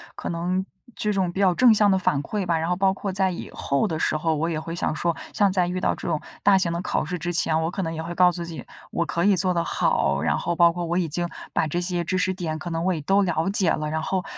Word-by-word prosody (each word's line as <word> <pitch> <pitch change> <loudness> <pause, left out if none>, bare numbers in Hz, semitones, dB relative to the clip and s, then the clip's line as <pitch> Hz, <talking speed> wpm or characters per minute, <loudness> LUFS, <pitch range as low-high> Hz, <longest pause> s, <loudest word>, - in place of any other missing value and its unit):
可 - - -5
能 180 +2 -1 0.3
这 210 - -1
种 190 -3 0
比 190 - -6
较 190 -2 +4
正 245 +1 +6
向 210 -1 +4
的 190 - +4
反 150 -6 +1
馈 200 +6 -3
吧， 170 -2 +1
然 160 +1 -2
后 180 - +1
包 190 +1 +2
括 195 0 -4
在 190 0 +1
以 175 - -7
后 140 -1 0
的 160 - -3
时 155 - +1
候， 160 +1 0
我 160 +3 -1
也 160 -2 -2
会 165 +1 -6
想 170 - -1
说， 170 +1 0 0.2
像 200 -2 +3
在 180 -2 +1
遇 180 +1 -2
到 - - 0
这 - - -7
种 160 -3 0 0.2
大 200 -1 +6
型 180 -3 +1
的 170 - -2
考 180 - -1
试 180 +3 -3
之 175 +1 -3
前， 165 -2 +2
我 165 - -1
可 195 - -3
能 165 -1 -3
也 160 0 -4
会 170 +1 -5
告 180 0 +5
诉 175 - -6
自 - - -8
己 165 -2 -8 0.3
我 170 - 0
可 170 +2 -1
以 200 0 +4
做 185 0 +2
得 170 -1 0
好， - - +1
然 - - +1
后 175 - -2
包 170 0 +5
括 175 0 -4
我 170 +1 -1
已 180 -2 +1
经 175 +3 -2 0.3
把 - - +1
这 170 +4 -2
些 175 -1 -1
知 185 +2 -1
识 185 +1 +1
点 165 -4 -4
可 175 - -6
能 165 0 -2
我 185 +1 +2
也 165 - -3
都 195 +7 +3
了 175 -1 0
解 195 -3 +3
了， 150 0 -1
然 160 +1 -2
后 185 +3 -1
175 Hz, 325 characters per minute, -24 LUFS, 165-185 Hz, 0.3 s, 正